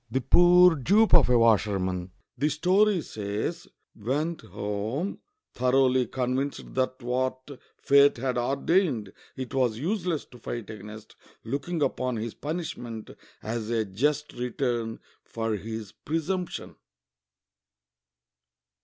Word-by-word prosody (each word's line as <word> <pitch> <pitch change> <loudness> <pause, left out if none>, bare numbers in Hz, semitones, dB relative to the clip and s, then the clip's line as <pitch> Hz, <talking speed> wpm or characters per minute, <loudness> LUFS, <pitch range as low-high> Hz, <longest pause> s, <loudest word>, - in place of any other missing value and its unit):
The 130 - 0
poor 175 +5 +6
dupe 205 - +3
of 160 -7 +7
a 125 - +5
washerman 95 -5 +2
— - - -55
the 150 +3 +2
story 185 +5 +3
says 105 +10 -4
— - - -51
went 145 +10 -2
home 105 - -3 0.3
thoroughly 130 0 +3
convinced 130 +3 -2
that 130 0 -1
what 130 +1 -1 0.3
fate 140 -1 +5
had 125 0 -1
ordained 135 - +1 0.2
it 130 -2 -6
was 125 -5 +1
useless 175 - -1
to 125 - -16
fight 115 -2 -5
against, 105 +1 -10 0.3
looking 145 +6 -2
upon 130 -3 -1
his 115 0 -4
punishment 145 -8 -5 0.3
as 110 0 -3
a 115 -2 +1
just 145 +10 -1
return 120 -2 -2 0.2
for 115 -1 -3
his 110 0 -6
presumption. 170 +3 -4
130 Hz, 120 wpm, -27 LUFS, 115-150 Hz, 0.3 s, of